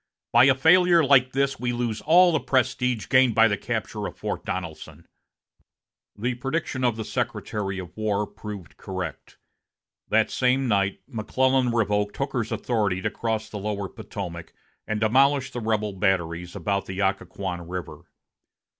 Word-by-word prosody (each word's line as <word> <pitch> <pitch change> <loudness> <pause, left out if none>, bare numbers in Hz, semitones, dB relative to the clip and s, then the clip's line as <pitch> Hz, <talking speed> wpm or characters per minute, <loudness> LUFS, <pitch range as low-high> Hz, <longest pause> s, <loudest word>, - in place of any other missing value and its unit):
By 120 +2 +7
a 135 -1 +5
failure 170 +4 +5
like 130 -2 +5
this 140 +1 0
we 120 -1 -1
lose 120 -3 -2
all 175 +3 +6
the 155 - +2
prestige 125 -4 0
gained 130 -4 +4
by 115 0 +6
the 105 - +1
capture - - -3
of - - -10
Fort - - -4
Donelson." 80 -3 -6 1.1
The 120 +4 -1
prediction 135 +2 -3
of 120 -3 +2
the 110 -1 -5
Secretary 95 -3 -3
of 90 -2 -8
War 105 -1 0
proved 100 -5 -9
correct. 90 -7 -6 0.7
That 110 0 +2
same 130 +1 +2
night, 100 -3 +1
McClellan 130 +2 +1
revoked 105 -3 0
Hooker's 135 -5 -2
authority 100 -6 -1
to 105 - 0
cross 110 -2 -2
the 105 -1 -7
lower 100 -1 -3
Potomac 85 -4 -8 0.3
and 110 0 -1
demolish 135 +5 +3
the 120 - -5
rebel 105 -2 -1
batteries 90 -2 -1
about 100 +1 -2
the 95 0 -5
Occoquan 95 -3 -2
River. 90 -2 -6
110 Hz, 150 wpm, -25 LUFS, 100-130 Hz, 1.1 s, By